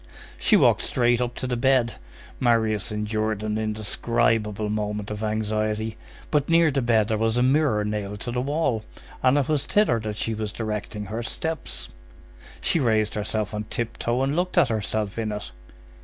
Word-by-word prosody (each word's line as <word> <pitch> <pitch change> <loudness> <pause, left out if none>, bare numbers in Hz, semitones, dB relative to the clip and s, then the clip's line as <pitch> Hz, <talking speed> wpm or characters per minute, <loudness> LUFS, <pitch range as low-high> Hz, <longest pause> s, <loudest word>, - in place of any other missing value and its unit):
She - - +5
walked - - +4
straight 120 -1 +2
up 120 0 -2
to - - -4
the 125 -1 -1
bed. 125 -1 +2 0.4
Marius 115 -3 +2
endured 105 0 -1
an 110 0 -1
indescribable 110 0 0
moment 105 0 -2
of 105 0 -5
anxiety; 110 0 -1 0.4
but 150 -1 +1
near 165 -1 +5
the 135 0 0
bed 115 -3 +3
there 110 -1 0
was 110 +1 +1
a 125 - +3
mirror 130 -6 +3
nailed 105 -1 -3
to 120 - -3
the 125 +1 -1
wall, 140 -5 0 0.4
and 130 +2 +4
it 140 -2 +1
was 150 -2 0
thither 205 - +3
that 105 -1 -4
she 115 - -1
was 110 -1 -3
directing 105 -1 -4
her 110 +4 -4
steps. 160 +7 -4 0.7
She 165 - +2
raised 110 -5 +2
herself 105 0 -2
on 105 0 -3
tiptoe 120 +2 -2
and 140 +2 0
looked 180 +1 -1
at 130 - +5
herself 110 -1 -2
in 110 -1 -1
it. 105 0 -5
110 Hz, 175 wpm, -25 LUFS, 105-125 Hz, 0.7 s, She